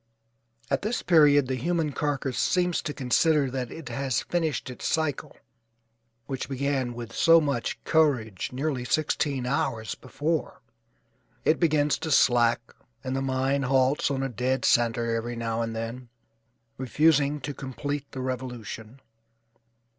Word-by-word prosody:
At - - +1
this 220 +4 -2
period 150 -5 +5
the 130 - -2
human 160 +4 -1
carcass 140 -3 -2
seems 180 -1 +1
to - - -4
consider 145 +1 +2
that 125 -2 -3
it 160 -6 -8
has 130 -1 -1
finished 160 -6 -2
its 125 - -5
cycle, 155 -4 -2 0.9
which 135 -1 -5
began 135 -2 -1
with 115 -1 -7
so 165 +5 +6
much 140 -6 -1
courage 130 - +1
nearly 135 0 -2
sixteen 140 -1 0
hours 115 -3 -1
before. 150 +2 -3 0.8
It 155 - +3
begins 150 -3 +2
to 160 - -4
slack 120 -4 +3 0.3
and 130 0 -3
the 135 - -1
mind 135 +1 0
halts 130 +2 +2
on 135 -1 -1
a - - 0
dead 125 +1 -1
centre 115 0 +2
every 120 +1 -3
now 115 0 -2
and 115 -1 -3
then, 115 +2 -5 0.7
refusing 145 +2 +2
to 145 +3 -4
complete 140 +1 -5
the 130 - -5
revolution. 125 -1 -6
135 Hz, 140 wpm, -26 LUFS, 120-150 Hz, 0.9 s, so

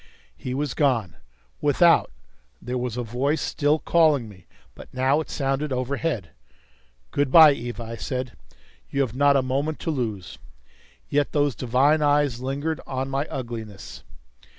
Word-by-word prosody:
He 130 0 -5
was 145 -2 -2
gone. 115 - 0 0.4
Without, - - +4 0.5
there 125 0 -4
was 125 -1 -3
a 125 - -2
voice 130 +7 -1
still 145 +1 +1
calling 155 -7 +2
me; 95 -5 -15 0.3
but - - -13
now 130 +3 +2
it - - -9
sounded 135 +1 -2
overhead. 130 - -2 0.8
"Good 140 -2 0
by, 160 -1 +9
Eva," 120 -2 -6
I 115 0 -6
said. 130 +2 -4 0.5
"You 140 - 0
have 125 -4 -2
not 140 +1 +4
a 135 - +1
moment 140 +4 -1
to 165 - -1
lose." 110 - -4 0.7
Yet 145 0 0
those 145 -2 +2
divine 130 +6 +2
eyes 145 -4 +2
lingered 140 +4 -3
on 130 0 -3
my 140 +3 -1
ugliness. 115 -6 -7
135 Hz, 150 wpm, -24 LUFS, 120-145 Hz, 0.8 s, by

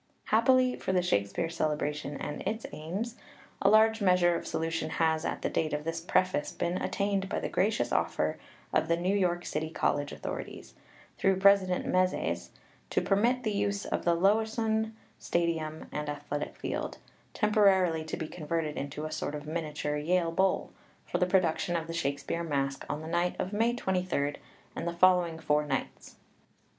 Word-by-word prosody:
Happily 255 +3 +3
for 190 - -2
the 180 -1 +3
Shakespeare 100 - 0
Celebration 150 -3 -2
and 150 - -5
its 220 +4 -3
aims, 195 +10 -4
PREFACE - - -24
xxi - - -22 0.4
a - - +5
large 220 +1 +5
measure 180 -2 +4
of - - -4
solution 165 -1 -2
has, 160 0 +1
at - - -3
the - - +2
date 155 -1 0
of 150 0 -1
this 165 +1 -3
preface, 185 -2 +1
been 175 +2 -1
attained 200 -1 -1
by - - -1
the - - -3
gracious 210 +4 +1
offer - - 0 0.3
of - - +2
the 170 0 +2
New 185 +3 +1
York 175 -3 +1
City 155 +1 -2
College 145 -2 0
authorities, - - -6 0.5
through 190 -1 +3
President 190 -2 +4
Mezes, 185 0 0 0.4
to - - +2
permit 235 +6 +2
the 215 - 0
use 200 0 -1
of - - -2
the 170 -1 +3
Lewisohn 220 +3 +1 0.3
Stadium 160 -2 -1
and 150 0 -3
athletic 145 0 -4
field, - - -4 0.4
temporarily 195 -6 +3
to 155 - -5
be 160 - -4
converted 155 -2 -3
into 145 +2 -4
a 155 - -5
sort 145 - -3
of 145 0 -6
miniature 150 -2 -2
Yale 170 +2 +1
Bowl, 190 +3 +1 0.3
for - - -2
the 180 - +3
production 175 -2 +2
of 165 -1 -1
the 165 - -6
Shakespeare 140 +1 -2
Masque 140 -3 -2
on 150 +1 -2
the 160 - -7
night 175 +2 0
of 190 - -3
May 230 +3 +2
23rd 180 -9 -1 0.4
and - - -3
the 170 - -1
following 175 -2 +4
four 150 -1 +1
nights. 150 - -4
170 Hz, 175 wpm, -30 LUFS, 155-195 Hz, 0.5 s, a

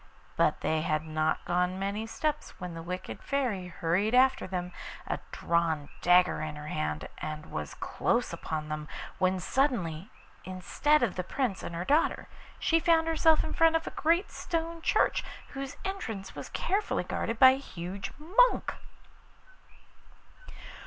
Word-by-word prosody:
But - - +2
they 160 0 +1
had 155 0 0
not 155 0 0
gone 180 +1 +1
many 200 +3 -2
steps 300 +5 -3
when 180 -1 -5
the 165 - -6
wicked 180 +2 -6
Fairy 245 -10 -1
hurried 180 +6 0
after 260 -3 +4
them, 180 -1 -3 0.3
a - - -2
drawn 165 -4 0
dagger 180 -1 +5
in 155 -1 -4
her 150 +1 -7
hand, 75 0 -2
and 155 0 -6
was 75 -1 -4
close - - 0
upon 155 -1 -4
them, 155 0 -4 0.3
when 185 0 +2
suddenly, 190 - 0 0.3
instead 220 +11 +1
of 210 -7 0
the 180 - -1
Prince 235 0 -1
and 170 - -6
her 170 +2 -3
daughter, 300 - +2 0.3
she 330 - +3
found 325 0 +4
herself 320 -1 +4
in - - -4
front 330 0 +5
of 325 - +1
a - - -4
great 335 +4 +1
stone 330 -1 -3
church, - - +2 0.3
whose 275 +1 -6
entrance 225 - -4
was - - -7
carefully 405 +3 0
guarded 230 - -2
by 260 +2 +9
a 260 - 0
huge 195 -6 -6
monk. 410 - +3
190 Hz, 150 wpm, -30 LUFS, -, 0.3 s, by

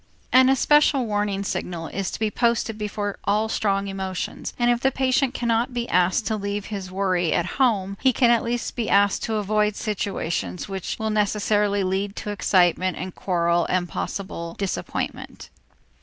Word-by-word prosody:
An 260 +1 +7
especial 275 0 +4
warning 205 -2 -1
signal 175 -4 -3
is 195 -1 -3
to - - -6
be 220 -1 0
posted 235 -1 +1
before 205 -1 -4
all 210 +2 +2
strong 200 -3 0
emotions, 190 -1 -4
and 240 0 +3
if 240 - +1
the 265 - +3
patient 265 0 +1
cannot 235 +1 0
be 240 0 -2
asked 180 +5 +2
to 220 - 0
leave 200 -1 -3
his 195 -2 -5
worry 185 -3 +1
at 175 - +1 0.2
home, 200 -6 +2
he 265 - +5
can 240 -1 +3
at 235 - +4
least 235 +1 -3
be 235 -3 -2
asked 200 0 +3
to 220 - -2
avoid 210 0 +1
situations 170 - -3
which 195 -2 -4
will 220 0 -2
necessarily 210 -1 +1
lead 195 +2 -1
to 210 - -4
excitement 185 -2 +2
and 185 0 -5
quarrel 170 -2 +1
and 180 -1 +1
possible 170 -4 -5
disappointment. 195 -2 -4
205 Hz, 170 wpm, -24 LUFS, 190-230 Hz, 0.2 s, An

